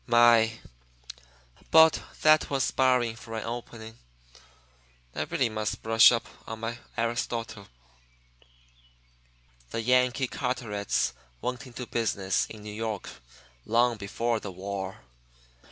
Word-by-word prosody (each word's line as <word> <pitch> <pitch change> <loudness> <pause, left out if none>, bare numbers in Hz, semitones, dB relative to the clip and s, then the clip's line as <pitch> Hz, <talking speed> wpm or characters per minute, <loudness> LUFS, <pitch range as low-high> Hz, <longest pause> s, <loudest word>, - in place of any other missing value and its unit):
My! 120 -1 +5 1.2
but 160 -1 +6 0.2
that 155 0 +5
was 135 -2 0
sparring 125 -4 +2
for 115 0 -9
an 110 - -4
opening! 115 -1 -7 1.1
I - - -3
really 130 - 0
must 110 -1 -3
brush 115 0 +7
op 115 -1 -1 0.2
on 110 0 -7
my 115 +1 -4 0.2
Aristotle. 115 -3 -3 2.0
The 115 - -3
Yankee 125 +1 +2
Carterets 120 -7 -2 0.3
went 125 - -4
into 125 0 -7
business 100 -6 0
in 110 -1 -11
New 105 0 -7
York 110 -2 -4 0.5
long 120 +1 +2
before 115 +3 -2
the 100 - -7
war. 95 -1 -6
115 Hz, 110 wpm, -28 LUFS, 110-125 Hz, 2.0 s, brush